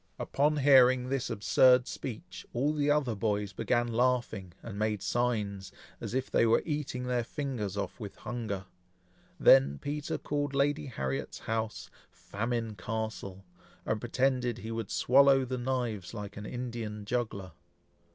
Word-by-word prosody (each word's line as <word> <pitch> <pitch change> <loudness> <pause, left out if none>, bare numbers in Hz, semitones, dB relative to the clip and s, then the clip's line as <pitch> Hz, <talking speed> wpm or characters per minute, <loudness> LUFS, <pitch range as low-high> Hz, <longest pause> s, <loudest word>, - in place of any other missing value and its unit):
Upon 150 +2 +1
hearing 130 -3 +5
this 135 -2 -1
absurd 125 +4 +5
speech, 130 +7 -7
all 140 +5 +1
the 145 -1 +1
other 145 -5 +2
boys 105 -1 -1
began 120 +5 +1
laughing, 120 -5 0
and 105 -3 -7
made 105 -2 0
signs, 105 -6 -1 0.3
as - - -5
if 130 0 -2
they - - +4
were 115 0 +4
eating 145 -5 -3
their 125 -1 0
fingers 115 - -4
off 100 -2 -4
with 105 -4 -7
hunger. 110 -5 -4 0.7
Then 70 +1 +6
Peter 145 - -3
called 145 -1 -2
Lady 145 +2 +1
Harriet's 65 - -3
house 110 -1 -3 0.2
"Famine 115 +1 -3
Castle," 105 -1 -5 0.4
and 110 - 0
pretended 125 0 0
he 115 -1 -6
would 115 -3 -4
swallow 135 +1 +5
the 130 0 -3
knives 120 -6 -2
like 105 -1 -6
an 105 0 -7
Indian 115 -4 -5
juggler. 105 -5 -2
120 Hz, 140 wpm, -30 LUFS, 105-130 Hz, 0.7 s, Then